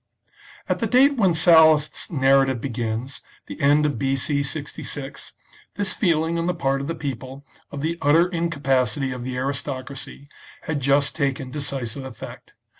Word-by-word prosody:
At - - -1
the - - 0
date 275 +3 +4
when 190 -7 +3
Sallust's 160 -3 +5
narrative 135 -4 +3
begins, 115 +1 -4 0.2
the - - -9
end 145 +2 +4
of 150 - -1
B.C. 135 +1 0
66, 140 -1 -5 0.4
this 200 -2 0
feeling 165 -2 +1
on 165 - -1
the 180 - 0
part 135 0 0
of 140 - -5
the 165 - -3
people 135 -2 -6 0.3
of 140 - -6
the 165 +3 -2
utter 160 +5 +4
incapacity 140 - 0
of 125 -1 -6
the 125 +1 -4
aristocracy, 140 +1 -5 0.4
had 160 -2 -2
just 140 +1 +1
taken 135 -3 -2
decisive 135 -3 -4
effect. 130 -4 -10
140 Hz, 150 wpm, -23 LUFS, 135-160 Hz, 0.4 s, Sallust's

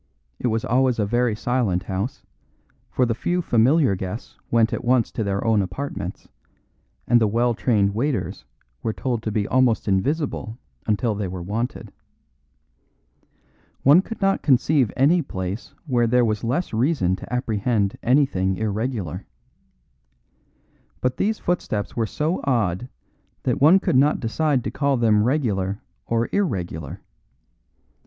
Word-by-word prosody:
It - - -1
was 110 -1 -1
always 130 0 +2
a 105 - +1
very 120 +1 +1
silent 110 -6 0
house, 95 +6 -4 0.6
for 125 - +1
the 115 - 0
few 175 +9 -1
familiar 130 - +3
guests 95 +4 -6
went 115 -1 +3
at - - -3
once 125 -1 +2
to 110 - -2
their 100 +1 -2
own 110 -2 +3
apartments, 95 -2 -5 0.8
and 120 0 +4
the 110 - +4
well 120 +3 +1
trained 105 -4 +1
waiters 115 - -2 0.4
were 110 - -2
told 120 -2 -2
to 110 - -3
be 105 -1 -1
almost 130 -4 +2
invisible 115 - -1 0.3
until 110 +2 +1
they 100 -1 -3
were 90 -1 -6
wanted. 110 +7 -4 1.9
One 145 +7 +7
could 225 +3 -8
not 195 0 +2
conceive 135 -2 +3
any 160 +7 +4
place 95 - -5
where 120 -5 +2
there 125 +1 +3
was 110 -2 -1
less 130 +9 -1
reason 110 - +1
to - - -11
apprehend 110 -4 0
anything 115 -8 +2
irregular. 110 - -3 1.7
But 125 0 -1
these 215 +2 0
footsteps 110 -12 -2
were 115 -2 0
so 155 - -1
odd 115 -4 0 0.5
that - - -1
one 165 +7 +7
could 130 - +1
not 145 +3 +3
decide 135 +2 0
to - - -3
call 140 -1 +1
them 110 -3 +3
regular 105 -7 0 0.2
or 115 0 +1
irregular. 90 - -2
115 Hz, 140 wpm, -23 LUFS, 100-130 Hz, 1.9 s, One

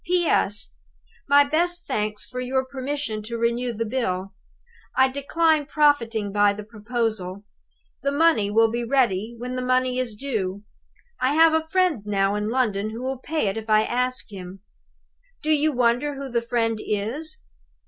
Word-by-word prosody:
G." 360 +1 +2
"P. - - 0
S. 210 -8 +1 0.6
My 285 0 +7
best 345 +4 0
thanks 210 0 -2
for 250 - -7
your 260 +1 0
permission 265 -4 -4
to 230 +2 -5
renew 235 +1 0
the 230 0 -3
bill. 195 -5 -2 0.6
I 265 0 +6
decline 300 +2 +1
profiting 235 -9 +2
by 205 0 +4
the 210 +1 -7
proposal. 215 -3 -3 0.6
The 280 - 0
money 285 -9 +3
will 225 +1 +4
be 240 +1 -2
ready 235 -4 +1
when 250 +2 -5
the 255 - -2
money 255 0 +1
is 240 -4 -2
due. 205 -6 -3 0.6
I 260 +3 +1
have 325 0 +6
a 320 0 +1
friend 360 - +2
now 200 -1 +1
in 210 +1 -1
London 215 -5 0
who 230 +3 -6
will 260 0 -3
pay 310 0 -1
it 195 +2 -1
if 220 0 -6
I 215 0 +5
ask 250 0 -1
him. 190 -1 -9 0.8
Do 310 - +1
you 305 0 +3
wonder 250 +3 +1
who 275 0 -6
the 235 -1 +1
friend 230 -2 0
is? 230 +10 -3
240 Hz, 170 wpm, -24 LUFS, 215-280 Hz, 0.8 s, My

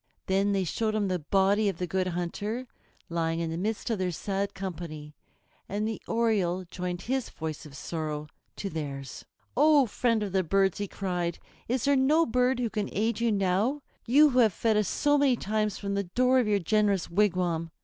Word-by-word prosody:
Then 195 +2 +2
they 195 -1 +1
showed 215 +5 -1
him 205 -2 0
the 180 -1 0
body 195 +6 +2
of 190 - -4
the 180 - -2
Good 185 +2 -1
Hunter 205 +7 -3 0.4
lying 165 -1 -1
in 165 -1 -2
the - - -3
midst 215 +5 -2
of 220 - -1
their 185 -1 0
sad 195 +3 -3
company, 165 -5 -6 0.6
and 210 +2 -1
the 220 - -4
Oriole 200 -6 +1
joined 180 0 -4
his 260 0 -1
voice 155 -1 -6
of 140 -2 -12
sorrow 155 -2 -4 0.3
to 200 - -4
theirs. 140 -4 -6 0.3
"O 295 0 +5
friend 230 -1 0
of 200 - -4
the 190 0 +2
birds," 195 +2 +2
he 205 - -2
cried, 180 -3 -2 0.3
"is 250 +1 0
there 280 0 +4
no 295 +5 +4
bird 250 +2 +2
who 240 -3 -1
can 210 -2 -2
aid 220 +1 0
you 235 -1 +2
now, 205 +8 +1 0.2
you 290 +5 +6
who 255 - +2
have 220 -5 +5
fed 225 -2 +1
us 210 -2 +2
so 290 +6 +2
many 275 -3 +4
times 215 -1 -1
from 200 -1 -3
the 200 0 -1
door 255 +8 +3
of 240 - +1
your 205 -1 +3
generous 200 0 +1
wigwam? 175 -4 +1
200 Hz, 200 wpm, -28 LUFS, 175-230 Hz, 0.6 s, you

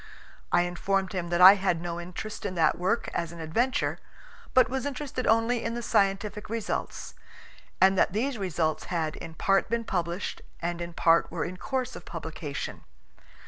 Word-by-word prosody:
I 175 - +4
informed 190 +2 -1
him 175 -2 -3
that 175 +1 +1
I 190 +2 +12
had 190 -4 0
no 170 0 -4
interest 180 +5 -7
in 185 -2 -3
that 160 -1 +2
work 185 +6 0
as 170 -1 -2
an 170 - -10
adventure, 225 +12 0 0.6
but 255 -1 +7
was 265 +2 -2
interested 270 -2 -4
only 225 +2 +3
in 230 +1 -2
the 240 - -4
scientific 205 -1 0
results, 225 -1 -3 0.7
and 190 0 +6
that - - +3
these 235 +4 -1
results 165 -5 -1
had 160 -4 -2
in 165 -1 -8
part 195 +2 +2
been 235 0 0
published 175 -3 -3 0.2
and 175 0 -3
in 170 0 -5
part 165 0 +3
were 165 -2 -2
in 180 +1 -6
course 260 +4 -3
of - - -9
publication. - - -6
190 Hz, 175 wpm, -28 LUFS, 170-225 Hz, 0.7 s, I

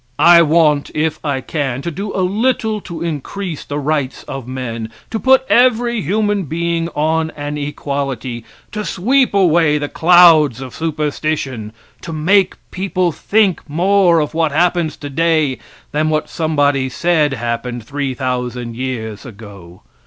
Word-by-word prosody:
I 170 0 +7
want, 155 -2 +3
if 155 0 -1
I 140 -3 -1
can, 135 -4 -3
to 170 - -3
do 200 +6 -5
a 185 - +1
little 220 +1 0
to 170 -2 -6
increase 170 +2 -4
the 145 - -5
rights 145 -2 -2
of 135 -3 -7
men, 115 -3 -5 0.2
to 220 - -2
put 265 +1 +4
every 240 -2 +3
human 205 +3 0
being 170 +2 -2
on 160 +1 +1
an 145 0 -4
equality, 140 -5 -4 0.3
to 210 -1 -4
sweep 245 +6 +1
away 165 -5 +3
the 145 0 -3
clouds 165 -7 +5
of 130 -2 -8
superstition, 150 -7 -3 0.3
to - - -7
make 185 +5 +2 0.2
people 185 -2 -1
think 200 +3 +1
more 175 +2 +3
of 150 0 -2
what 160 -1 +1
happens 170 0 +1
today 150 -2 0 0.3
than 155 +1 0
what 155 -1 -1
somebody 145 -4 0
said 155 0 +1
happened 120 -1 -4
3,000 125 -3 -3
years 115 -4 -5
ago. 100 -7 -12
155 Hz, 140 wpm, -17 LUFS, 135-175 Hz, 0.3 s, I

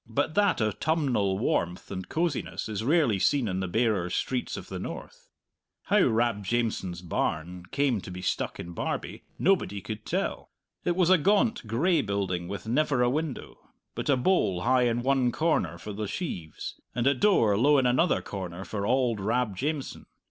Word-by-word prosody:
But 145 +6 0
that 205 +2 +3
autumnal 110 -3 +1
warmth 90 -5 -1
and 95 -2 -5
cosiness 165 -3 -2
is 110 -1 -3
rarely 140 - +3
seen 135 +3 +2
in 95 -1 -2
the 95 - -2
barer 105 -3 +1
streets 125 +7 -2
of - - -8
the - - -5
north. - - -8 0.6
How - - +3
Rab 115 -2 +1
Jamieson's 95 -5 -1
barn 90 +1 -2
came 135 -6 +1
to - - -9
be 90 0 -7
stuck - - -2
in 85 - -6
Barbie 85 - -4
nobody 175 - +1
could 110 +2 -6
tell. - - -2 0.4
It 175 - +1
was 180 -1 +3
a 185 - +6
gaunt, 205 - +2
gray 155 +9 +2
building 95 -5 -2
with 100 +3 -6
never 130 +1 +2
a 120 - +3
window, 150 -1 -4 0.3
but - - -4
a 140 - +4
bole 125 - +2
high 125 +2 +3
in 120 0 0
one 130 -2 +2
corner 115 - 0
for 105 +4 -7
the 105 +1 -3
sheaves, 90 - -5
and 120 -1 0
a 140 - +5
door 125 - +3
low 140 +7 +4
in 130 - +3
another 130 +8 +2
corner 95 -2 -6
for 100 +1 -3
auld 125 -4 +2
Rab 110 +1 0
Jamieson. 145 +6 -3
120 Hz, 175 wpm, -28 LUFS, 95-145 Hz, 0.6 s, a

